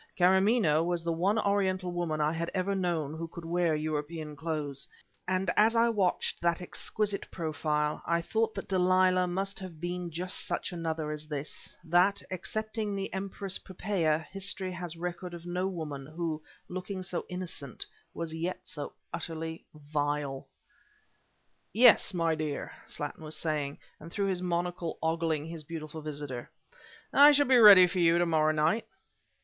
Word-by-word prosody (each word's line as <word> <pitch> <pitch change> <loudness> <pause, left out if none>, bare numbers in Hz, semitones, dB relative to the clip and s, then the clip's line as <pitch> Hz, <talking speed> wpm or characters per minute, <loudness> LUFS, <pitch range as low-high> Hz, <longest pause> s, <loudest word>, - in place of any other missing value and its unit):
Karamaneh 190 -3 +4
was 175 -1 -1
the 170 - 0
one 190 +6 +2
Oriental 190 -3 +1
woman 170 -3 -2
I 150 +1 +2
had 165 +1 -2
ever 190 +1 0
known 170 -6 -1
who 165 +1 -4
could 170 0 -9
wear 170 -1 +1
European 155 0 -3
clothes; 145 -3 -3 0.4
and 185 +1 +1
as 220 +2 +5
I 230 +1 +5
watched 200 -6 0
that 170 -1 +2
exquisite 200 +3 -2
profile, 150 -2 -1
I 170 0 +2
thought 220 +6 0
that 195 - -5
Delilah 185 -1 +3
must 195 +2 -2
have 185 -5 -8
been 175 +1 -3
just 175 +3 -3
such - - -2
another 160 -3 -2
as 150 0 -5
this, 150 -1 -6
that, 180 +4 +3
excepting 215 +3 -3
the 195 -1 -4
Empress 195 0 -3
Poppaea, 170 -5 -1
history 195 -1 0
has 175 -2 -6
record 175 +1 -5
of 170 0 -10
no 180 +2 -1
woman, 150 -7 -5
who, 160 0 -3 0.3
looking 185 +1 -5
so 175 -1 -3
innocent, 180 -7 -5 0.3
was 165 -1 -4
yet 170 +3 -3
so 145 - -5 0.2
utterly 160 0 -4
vile. 145 -2 -2 1.3
"Yes, 230 0 +7
my 165 -3 +1
dear," 155 -2 -3 0.2
Slattin 145 +2 -5
was 155 0 -4
saying, 150 -3 -1 0.2
and 160 - -10
through 200 +1 0
his 180 -2 -1
monocle 175 -1 -2
ogling 160 -2 0
his 165 -1 -7
beautiful 155 0 -7
visitor, 145 -5 -6 0.6
"I 290 +1 +9
shall 285 0 +5
be 260 -2 +5
ready 205 -5 +10
for 180 +1 -2
you 170 0 +5
to 175 - +3
morrow 155 -2 +3
night." 155 +8 +1
170 Hz, 155 wpm, -30 LUFS, 155-185 Hz, 1.3 s, ready